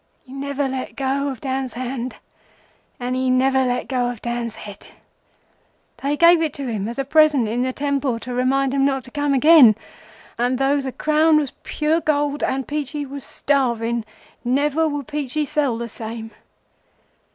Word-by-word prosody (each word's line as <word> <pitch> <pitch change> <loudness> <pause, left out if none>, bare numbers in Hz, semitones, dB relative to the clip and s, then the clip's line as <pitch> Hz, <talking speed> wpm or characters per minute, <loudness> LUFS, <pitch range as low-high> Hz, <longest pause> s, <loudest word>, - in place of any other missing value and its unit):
He 260 - -14
never 280 0 -2
let 265 -1 -5
go 275 +1 -1
of 260 -4 -7
Dan's 265 -2 -3
hand, 250 0 -4 0.8
and 250 +1 -2
he 260 0 0
never 265 +1 +3
let 250 -1 -1
go 250 -2 0
of 240 -3 -6
Dan's 235 -1 -3
head. 205 -1 -11 1.1
They 285 +2 -2
gave 340 0 +6
it 310 -3 -1
to 280 - -4
him 215 -4 -2
as 235 - -6
a 275 - -1
present 300 -4 +4
in 235 +3 -1
the 255 +1 0
temple, 280 -3 -1
to 250 - -6
remind 265 +2 +1
him 275 -1 +2
not 270 -1 +1
to 250 - -12
come 290 0 0
again, 275 -5 +7 0.6
and 245 +1 +1
though 275 +2 +2
the 265 -1 -4
crown 310 +3 +3
was 290 -4 -1
pure 310 +2 0
gold, 290 -1 0
and 265 -1 -1
Peachey 295 0 -3
was 280 0 -8
starving, 235 -4 0 0.4
never 290 +5 +1
would 290 -2 -3
Peachey 295 0 -2
sell 280 -4 0
the 235 0 -4
same. 225 0 -6
270 Hz, 175 wpm, -21 LUFS, 245-290 Hz, 1.1 s, again